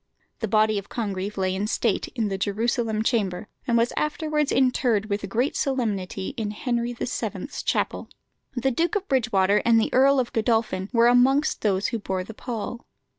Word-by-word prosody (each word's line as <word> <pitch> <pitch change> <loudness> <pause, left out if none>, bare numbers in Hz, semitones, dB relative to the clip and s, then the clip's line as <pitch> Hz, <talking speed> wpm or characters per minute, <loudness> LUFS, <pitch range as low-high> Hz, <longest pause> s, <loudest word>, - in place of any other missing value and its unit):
The 220 - -2
body 215 0 +3
of 200 - -12
Congreve 200 -3 -3
lay 185 -1 0
in 200 +2 -2
state 225 -2 0
in 225 -4 0
the 195 - -2
Jerusalem 220 +2 0
Chamber, 205 -5 0 0.2
and 235 -1 +3
was 230 +1 +2
afterwards 300 -1 0
interred 240 -5 +2
with 200 -1 -2
great 245 +7 0
solemnity 205 -8 -1
in 220 -3 -2
Henry 235 +2 -2
VII.'s 240 - -4
Chapel. - - -1 0.5
The 260 +2 +1
Duke 340 - 0
of 400 -1 -1
Bridgewater 210 -7 +2
and 230 -1 +5
the 220 - -1
Earl 275 +1 +5
of 245 -2 -2
Godolphin 220 -4 0
were 235 -1 +4
amongst 260 +5 +4
those 200 -2 +1
who 230 - -3
bore 190 -2 -3
the 225 - -9
pall. 235 +1 -5
225 Hz, 175 wpm, -25 LUFS, 205-245 Hz, 0.5 s, and